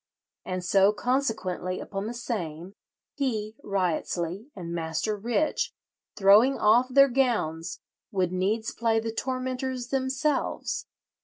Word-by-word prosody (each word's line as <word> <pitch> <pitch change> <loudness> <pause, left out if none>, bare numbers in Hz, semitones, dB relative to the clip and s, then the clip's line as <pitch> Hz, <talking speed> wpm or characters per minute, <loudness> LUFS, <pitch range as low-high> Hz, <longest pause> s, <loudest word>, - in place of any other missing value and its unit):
And 185 -1 -4
so 195 +2 +5
consequently 220 -8 -1
upon 195 +1 -4
the 240 - -5
same, 185 -7 -4 0.4
he 220 -6 -2
(Wriottesley) 185 - -1
and 170 -3 -6
Master 165 +5 -1
Rich, 235 +9 0 0.4
throwing 210 +7 +6
off 230 +4 +5
their 275 +2 +7
gowns, 235 - 0 0.3
would 185 -3 0
needs 205 +4 0
play 225 -1 +1
the 225 0 -3
tormentors 255 0 -3
themselves. 270 +2 -1
215 Hz, 110 wpm, -27 LUFS, 185-255 Hz, 0.4 s, their